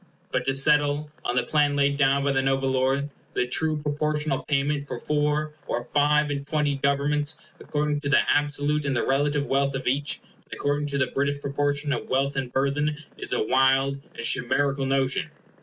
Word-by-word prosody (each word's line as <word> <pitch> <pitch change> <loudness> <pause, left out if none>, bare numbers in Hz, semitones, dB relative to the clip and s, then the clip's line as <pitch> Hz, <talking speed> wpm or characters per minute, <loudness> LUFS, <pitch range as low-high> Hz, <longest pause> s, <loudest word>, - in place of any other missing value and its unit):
But - - -1
to 135 - 0
settle, 145 +1 +2
on 120 - -1
the 125 - +2
plan 145 -2 +2
laid 140 0 +2
down 140 0 +2
by 140 - +2
the 135 -1 +2
noble 135 0 +1
lord, 135 +2 0 0.2
the 125 - +2
true 155 +5 +1
proportional 150 -1 -1
payment 145 0 0
for - - -4
four 150 0 0
or 120 0 -2
five 150 +1 +2
and 140 0 -4
twenty 150 -2 0
governments 145 +2 0 0.2
according 150 0 -1
to 140 - -3
the - - +5
absolute 145 +1 +1
and 140 -2 -1
the 120 - 0
relative 145 +1 +1
wealth 140 0 +1
of 135 - -4
each, 140 +3 -1 0.2
and - - -11
according 145 +1 -1
to 140 -1 -2
the 130 - +2
British 140 +1 0
proportion 145 +1 -1
of 120 - -4
wealth 135 +2 +1
and 130 -2 -3
burthen, 145 +3 0 0.2
is - - -5
a - - +1
wild 135 +3 +3 0.2
and 115 - -5
chimerical 135 +3 +1
notion. 135 -1 0
140 Hz, 190 wpm, -25 LUFS, 135-145 Hz, 0.2 s, the